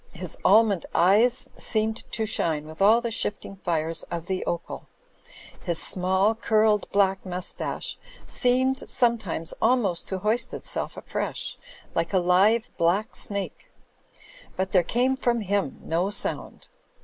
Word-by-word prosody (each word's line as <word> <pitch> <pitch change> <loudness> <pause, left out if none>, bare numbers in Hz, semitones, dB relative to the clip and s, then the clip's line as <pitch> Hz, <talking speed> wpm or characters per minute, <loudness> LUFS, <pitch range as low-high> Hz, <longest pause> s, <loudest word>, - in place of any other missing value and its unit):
His 180 -2 -7
almond 205 -2 +4
eyes 235 +9 +4
seemed 220 -1 -1
to 220 - -1
shine 160 -8 0
with 155 +4 -10
all 220 +4 +6
the 235 -1 -3
shifting 205 -2 -2
fires 165 -3 +1
of 170 -1 -4
the 185 0 -2
opal; 170 -1 -4 0.8
his 170 -3 -1
small, 190 +5 +1
curled 215 -2 +2
black 195 -1 +2
mustache 180 -1 -4 0.3
seemed 260 +2 +1
sometimes 220 -10 +1
almost 220 -7 +2
to 190 - -3
hoist 230 +6 -1
itself - - -4
afresh, - - -4 0.4
like 165 +3 -1
a - - +4
live, 190 +6 +3
black 180 +6 +1
snake; 200 -1 -5 0.9
but 190 0 -2
there 185 - +5
came 250 +9 +1
from 240 -3 0
him 200 -7 -1
no 170 +4 0
sound. 205 - -2
200 Hz, 135 wpm, -25 LUFS, 180-225 Hz, 0.9 s, all